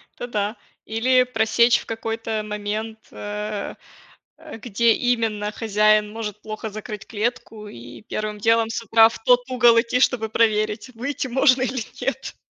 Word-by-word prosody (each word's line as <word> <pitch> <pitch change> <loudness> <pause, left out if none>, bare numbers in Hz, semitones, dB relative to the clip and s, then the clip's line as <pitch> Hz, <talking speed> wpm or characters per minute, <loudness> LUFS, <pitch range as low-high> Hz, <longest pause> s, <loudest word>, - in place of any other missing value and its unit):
это 245 - -6
да. 210 -1 -2 0.3
Или 250 +3 +3
просечь 235 0 +3
в - - -11
какой-то 225 -1 -3
момент, 215 +1 -4
э, 210 0 -5 0.6
э, 315 -7 -10
где 230 0 +2
именно 225 -4 -1
хозяин 215 -1 +2
может 210 -2 -6
плохо 215 0 -6
закрыть 210 0 -8
клетку 220 -1 -4
и 120 - -11
первым 215 0 -4
делом 225 +1 +2
с 230 - -3
утра 225 +1 +6
в - - -10
тот 245 0 +5
угол 240 -2 +5
идти, 250 +1 -1
чтобы 230 -4 +1
проверить, 215 0 +1
выйти 265 +3 -3
можно 260 +1 +3
или 255 -2 -2 0.2
нет. - - -4
225 Hz, 150 wpm, -22 LUFS, 210-240 Hz, 0.6 s, утра